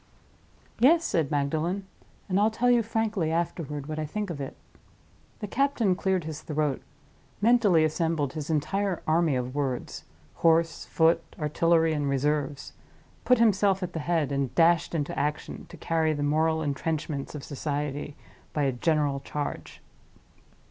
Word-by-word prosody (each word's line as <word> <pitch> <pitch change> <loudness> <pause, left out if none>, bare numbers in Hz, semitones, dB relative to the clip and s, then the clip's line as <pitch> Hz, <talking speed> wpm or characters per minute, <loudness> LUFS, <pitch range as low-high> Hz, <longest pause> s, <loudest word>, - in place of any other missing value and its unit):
"Yes," 320 +8 +5
said 160 -7 0
Magdalen; 160 +7 -1 0.4
"and 190 0 +1
I'll 210 +2 +4
tell 245 +3 +2
you 240 -1 +5
frankly 220 -6 -1
afterward 165 -4 -2
what 155 +1 -4
I 155 - -2
think 205 +3 -3
of 145 -4 -5
it." 135 - -6 0.8
The 210 - -3
captain 240 -5 +1
cleared 190 -2 0
his 155 0 -6
throat; 150 -3 -1 0.6
mentally 210 -7 +4
assembled 155 -3 0
his 155 -1 -5
entire 185 +5 -1
army 160 -2 +2
of 125 0 -3
words—horse, 140 - -1
foot, 165 +1 +3 0.2
artillery, 165 +2 +2
and 145 -2 -1
reserves; 145 +1 -1 0.5
put 250 - +5
himself 200 -4 +3
at 180 -1 -4
the 160 - -3
head; 160 -2 0
and 140 -2 -1
dashed 170 0 +3
into 150 -3 -2
action, 150 +1 -3
to - - -11
carry 160 -1 +1
the 145 -1 -2
moral 160 +2 +1
intrenchments 150 0 -3
of 145 - -6
Society 145 0 -4 0.4
by 150 - 0
a 135 - +2
general 145 +1 +1
charge. 145 +1 -6
160 Hz, 145 wpm, -27 LUFS, 145-185 Hz, 0.8 s, Yes